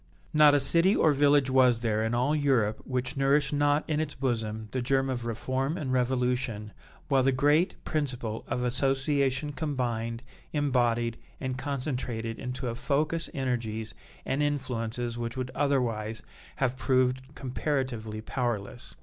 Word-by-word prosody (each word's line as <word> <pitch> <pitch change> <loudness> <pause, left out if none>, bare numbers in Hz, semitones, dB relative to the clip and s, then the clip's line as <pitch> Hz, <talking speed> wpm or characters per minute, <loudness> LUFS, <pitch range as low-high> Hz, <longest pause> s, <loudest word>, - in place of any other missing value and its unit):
Not 150 -1 +7
a - - +5
city 170 +9 +3
or 155 - +4
village 140 -1 +4
was 125 -3 +4
there 110 -2 +1
in 115 +1 0
all 130 +5 +2
Europe 130 -8 +2
which 125 +2 -2
nourished 140 +1 +2
not 145 +1 +2
in 155 -1 0
its 155 -2 -2
bosom 110 -4 -2
the 130 - -1
germ 135 +2 +1
of 120 -2 -3
reform 130 +7 -1
and 135 -7 -2
revolution, 125 -4 0 0.4
while 135 -2 +3
the 135 +1 +3
great 145 +7 +3
principle 125 -8 -2
of 125 - -1
association 135 +2 +1
combined, 120 -6 -2 0.3
embodied, 120 -5 +1 0.2
and 130 -1 -3
concentrated 125 -4 -3
into 125 0 -4
a 115 - -1
focus 150 +6 -1
energies 110 -5 -2 0.3
and 135 - 0
influences 120 -4 -2
which 115 +1 -4
would 130 0 -3
otherwise 115 -6 0 0.3
have 130 -1 0
proved 130 0 +1
comparatively 125 -5 -2
powerless. 120 -2 -3
130 Hz, 140 wpm, -28 LUFS, 120-140 Hz, 0.4 s, Not